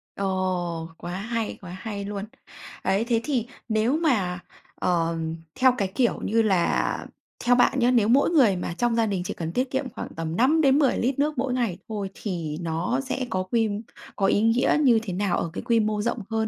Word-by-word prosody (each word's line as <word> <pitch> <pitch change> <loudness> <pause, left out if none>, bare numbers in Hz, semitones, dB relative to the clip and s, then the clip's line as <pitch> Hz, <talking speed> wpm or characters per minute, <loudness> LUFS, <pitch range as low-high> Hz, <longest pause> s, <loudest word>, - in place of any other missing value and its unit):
Ồ, 180 -4 -2
quá 175 - -7
hay, 225 +2 -3
quá 180 -2 -9
hay 205 -3 -5
luôn. 200 0 -4 0.6
Ấy, 195 +4 +1
thế 235 -1 +1
thì, 245 -3 -1 0.2
nếu 220 +6 +2
mà, 205 - +1 0.4
ờ, 170 -2 0 0.4
theo 255 0 +5
cái 195 -2 -1
kiểu 245 -3 +2
như 225 +2 +2
là 190 -6 +1 0.4
theo 245 0 +5
bạn 245 +2 +3
nhá, 245 0 +4
nếu 230 -4 +3
mỗi 260 +5 +4
người 265 - +4
mà 175 -1 -3
trong 240 -1 +1
gia 230 -1 +3
đình 195 -4 -1
chỉ - - -3
cần 165 -1 -4
tiết 255 +1 0
kiệm 265 -1 -1
khoảng - - -6
tầm 165 0 -3
5 285 - +4
đến 275 -1 +4
10 275 -4 +3
lít 260 +3 0
nước 295 0 +1
mỗi 255 0 0
ngày 235 -8 -1
thôi 205 -3 -3
thì 170 -8 -4
nó 170 +9 -1
sẽ 265 -1 -3
có 185 -4 -1
quy 225 +3 +1 0.5
có 195 - +1
ý 200 - +3
nghĩa 225 +5 +3
như 240 -5 +5
thế 195 -5 -4
nào 195 0 0
ở 170 - -2
cái - - -4
quy 235 -2 +3
mô 210 -1 0
rộng 235 +3 -1
hơn, 220 -1 0
220 Hz, 210 wpm, -25 LUFS, 185-250 Hz, 0.6 s, theo